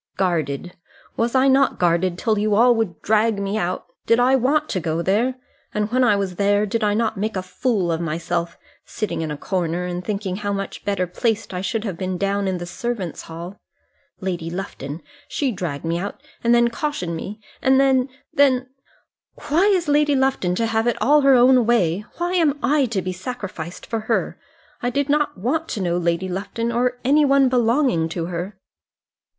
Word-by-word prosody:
Guarded! 170 -3 -1 0.4
Was 235 +2 0
I 260 +1 +5
not 270 +1 +3
guarded, 175 0 +1
till 215 +1 +1
you 210 0 +2
all 240 +3 +6
would 220 -8 -2
drag 220 0 +2
me 200 +1 -2
out? 180 -4 -2 0.2
Did 230 - +4
I 255 +2 +4
want 285 +4 +2
to 190 - -1
go 165 0 -2
there? 225 +8 +1 0.4
And 210 0 -1
when 255 +1 +3
I 240 -4 +4
was 195 -3 -2
there, 205 +1 +3
did 220 +2 -2
I 205 -1 +2
not 220 -1 0
make 215 +2 -2
a 185 - -2
fool 185 0 -1
of 165 0 -1
myself, 170 +1 -2 0.3
sitting 215 -6 -3
in 160 - -3
a 150 - -4
corner, 175 0 -2
and 180 0 -4
thinking 195 -1 -3
how 205 -1 -2
much 195 0 -5
better 200 -3 0
placed 215 +3 -2
I 180 - -3
should 215 +3 -2
have 195 -7 -4
been 185 -1 -2
down 200 +1 0
in 185 -1 -1
the 175 - -5
servants' 195 -1 -4
hall. 170 +4 -9 0.6
Lady 175 -3 -3
Lufton 165 -4 -6 0.2
she 275 -3 -1
dragged 175 -8 -4
me 165 +1 0
out, 200 +3 -5 0.2
and 235 0 +4
then 235 0 +3
cautioned 235 - -3
me, 200 +6 -6 0.2
and 265 0 +4
then, 265 -1 +3 0.2
then 260 -4 +3 0.8
Why 330 +7 +4
is 370 -5 +2
Lady 295 0 +3
Lufton 265 -10 +1
to 230 - 0
have 225 +1 0
it 240 - 0
all 295 +2 +4
her 275 -1 +6
own 250 -1 +5
way? 205 -4 +2
Why 350 +1 -1
am 320 -5 +2
I 290 -1 +3
to 205 -5 -2
be 185 - -3
sacrificed 185 -4 -6
for 225 - -2
her? 220 +1 -1 0.4
I 245 - 0
did 280 +3 -1
not 295 -4 +1
want 295 - -1
to 215 - -3
know 175 0 0
Lady 170 +1 0
Lufton, 205 +5 -3
or 245 +1 0
any 295 +3 +5
one 275 -2 +4
belonging 240 - +2
to 165 0 -3
her." 180 +3 -5
210 Hz, 195 wpm, -22 LUFS, 180-250 Hz, 0.8 s, all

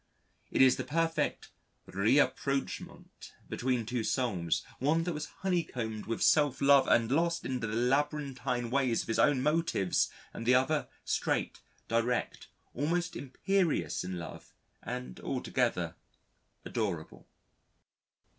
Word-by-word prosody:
It - - +4
is 130 - +5
the - - -2
perfect 165 +1 -1 0.4
rapprochement 135 +6 -1
between 125 -2 -1
two 120 0 -2
souls, 100 -11 0 0.2
one 155 +5 +2
that 175 0 -2
was 150 0 -4 0.2
honeycombed 125 - -2
with 115 - -1
self 145 -4 +4
love 140 -1 +6
and 115 0 +3
lost 170 +3 +1
in 130 -1 -2
the 115 - -3
labyrinthine 125 0 0
ways 130 -4 +1
of - - -14
his 115 - 0
own 135 -3 +4
motives 150 - +1 0.2
and 115 - -6
the 125 - +6
other 140 +4 +2 0.2
straight, - - -1 0.3
direct, 115 +1 -1 0.3
almost 170 +5 -1
imperious 165 - 0
in 90 0 -4
love 85 -1 -9 0.3
and 65 0 -6
altogether - - -1 0.7
adorable. 95 -9 -4
130 Hz, 120 wpm, -31 LUFS, 115-150 Hz, 0.7 s, love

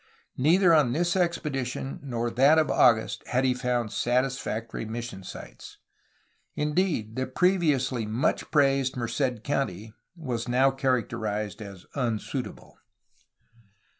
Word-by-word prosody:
Neither 170 +6 +5
on 145 -7 +4
this 175 +5 +1
expedition 140 -7 -2
nor 120 -4 -2
in - - -10
that 140 +5 +5
of 155 -1 +2
August 115 -3 +3
had 130 +1 +1
he 130 - +3
found 125 -3 -1
satisfac 120 -2 -1
tory - - -4
mission 115 -3 -6
sites. - - -10 0.8
Indeed 150 - 0
the 130 0 -2
previously 135 - +1
much 110 +5 0
praised 135 -3 +2
Merced 120 -1 -2
country 110 -7 -2 0.2
was 125 -9 -4
now 130 +2 +3
characterized 115 -5 -2
as 100 -3 -10
unsuitable. 125 0 -4
125 Hz, 120 wpm, -27 LUFS, 115-140 Hz, 0.8 s, Neither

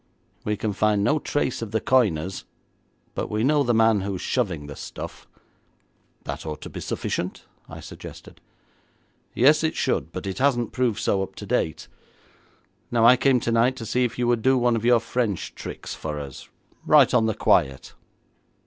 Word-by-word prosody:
We 105 0 -1
can 105 0 -2
find 105 0 +2
no 150 +8 +2
trace 140 -4 -2
of 115 - -4
the 110 +2 0
coiners, 95 -10 +1 0.7
but - - -3
we 105 +1 -1
know 145 +3 +3
the 120 -3 +1
man 110 -2 +4
who 100 0 -3
is 90 - -6
shoving 95 - -1
the 70 -1 -8
stuff.' - - -8 1.0
'That - - -5
ought 75 -2 -6
to - - -8
be - - -7
sufficient,' - - -4 0.2
I - - -9
suggested. - - -11 0.9
'Yes, 150 +6 +5
it 160 - 0
should, 80 - -1
but 95 - -6
it 95 +3 -4
hasn't 125 -4 +1
proved 125 -5 0
so 95 - +1
up 95 - -5
to - - -8
date. 80 - -1 1.0
Now 115 -1 +3
I 125 +2 +8
came 130 0 +3
tonight 115 +2 +2
to 115 - -7
see 125 +3 +1
if 120 -2 -2
you 120 -1 0
would 120 -2 +2
do 130 +2 +3
one 120 -1 +2
of 115 - -2
your 120 -1 +5
French 115 -4 -2
tricks - - -7
for 75 -1 -5
us, 70 -3 -9 0.3
right - - +5
on 115 -3 +4
the 110 - -1
quiet.' 65 0 +1
115 Hz, 185 wpm, -24 LUFS, 100-125 Hz, 1.0 s, I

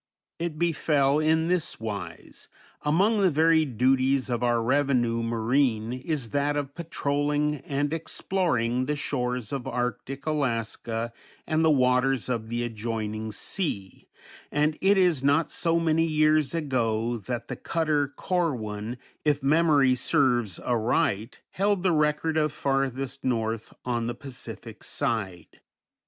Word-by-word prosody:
It 165 -2 -3
befell 150 -4 +2
in 160 +1 +2
this 180 -2 0
wise: 100 -7 -7 0.3
Among 195 +9 +2
the 190 - +5
varied 160 -5 +3
duties 130 +1 +2
of 120 -1 -1
our 120 -1 +2
revenue 120 -2 +1
marine 115 0 +1
is 130 -2 -3
that 145 +1 +1
of 140 -1 -3
patrolling 150 -2 -1
and 145 +2 -2
exploring 130 -8 -1
the 150 - 0
shores 125 -4 -2
of 135 -3 -3
arctic 125 +3 -3
Alaska 115 -5 -2 0.3
and 155 +1 +1
the 160 - +5
waters 130 -2 +2
of 115 -3 -2
the 120 +1 -1
adjoining 110 -1 -3
sea, 105 - -4 0.4
and 150 +1 +1
it 195 +1 +4
is 175 -8 +3
not 145 +3 +2
so 170 0 +1
many 165 0 +2
years 155 -1 +2
ago 120 -6 0
that 120 +3 -5
the - - -4
cutter 155 -3 0
Corwin, 125 - -2 0.3
if 145 -2 +1
memory 145 -3 +4
serves 125 - +1
aright, 115 -1 0
held 200 -1 +1
the 185 - +3
record 155 +1 +1
of 155 -1 +2
farthest 135 -2 -2
north 115 -3 -1
on 120 -2 -1
the 120 - -3
Pacific 115 -4 -8
side. 95 -7 -3
135 Hz, 130 wpm, -26 LUFS, 115-155 Hz, 0.4 s, the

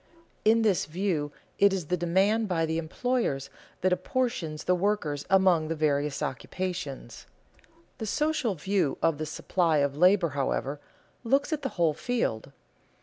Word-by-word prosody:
In 225 +1 +4
this 205 -5 +2
view 160 -3 -1 0.3
it 200 0 +6
is 190 -4 -2
the 180 - 0
demand 190 +6 +2
by 165 -4 +1
the 160 +1 -1
employers 165 - -1 0.3
that 185 0 +3
apportions 180 - -2
the 180 - +2
workers 180 -6 -1
among 185 -4 +4
the 165 - -2
various 145 -2 0
occupations. 180 -2 -5 0.7
The 220 - -4
social 300 -4 0
view 185 -2 0
of 165 -3 +2
the 155 - -3
supply 165 +1 0
of 140 -1 +1
labor, 180 +2 +4
however, 140 0 -2 0.4
looks 275 +6 +1
at 300 - -2
the 270 - -2
whole 165 -3 +3
field. 145 - -2
180 Hz, 145 wpm, -28 LUFS, 150-205 Hz, 0.7 s, it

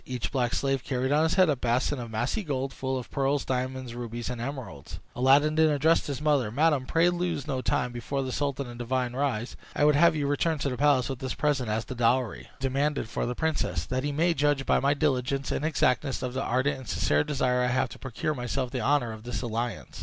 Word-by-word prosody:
Each 125 -2 -4
black 125 -3 0
slave 135 -2 0
carried 130 0 -1
on 150 +1 +4
his 160 +1 +2
head 185 -1 +5
a 150 - +2
basin 125 +3 0
of 120 -1 -6
massy 120 - -1
gold, 135 -6 -3
full 130 0 -2
of 125 - -7
pearls, 140 0 0
diamonds, 130 -1 -3
rubies, 120 0 -5
and 120 -2 -5
emeralds. 125 - -6 0.2
Aladdin 140 +4 +4
then 160 0 +4
addressed 155 +3 +2
his 140 -3 -3
mother; 145 -7 +2
"Madam, 140 +1 +2
pray 170 +2 +3
lose 175 -5 -2
no 135 -4 -2
time; 125 -1 0
before 135 +3 -3
the 130 - -4
sultan 140 0 -2
and 120 -1 -9
the - - -3
divan 125 0 -1
rise, 130 -4 -1 0.2
I 145 - +3
would 150 - +6
have 165 +2 +5
you 145 -2 -1
return 150 +3 +1
to 140 - -1
the 125 - -3
palace 140 -3 +3
with 135 -3 -4
this 130 -2 -4
present 140 -6 0
as 110 0 -1
the 130 - -6
dowry 120 0 0
demanded 135 -1 0
for - - -2
the 125 - -3
princess, 160 +1 -1
that 130 0 -2
he 145 - -1
may 165 +4 +2
judge 145 -2 +1
by - - +3
my 140 +2 +2
diligence 135 -2 0
and - - -2
exactness 140 -3 +1
of 125 -1 -3
the 130 - -2
ardent 135 +2 0
and 130 - -11
sincere 75 +1 +2
desire 125 -3 +1
I 125 - +2
have 130 0 +1
to - - -11
procure 130 +4 -3
myself 125 0 -3
the 130 - -2
honor 140 -5 +2
of 110 -1 -8
this 120 +2 -4
alliance." 115 -2 -4
130 Hz, 235 wpm, -27 LUFS, 125-145 Hz, 0.2 s, would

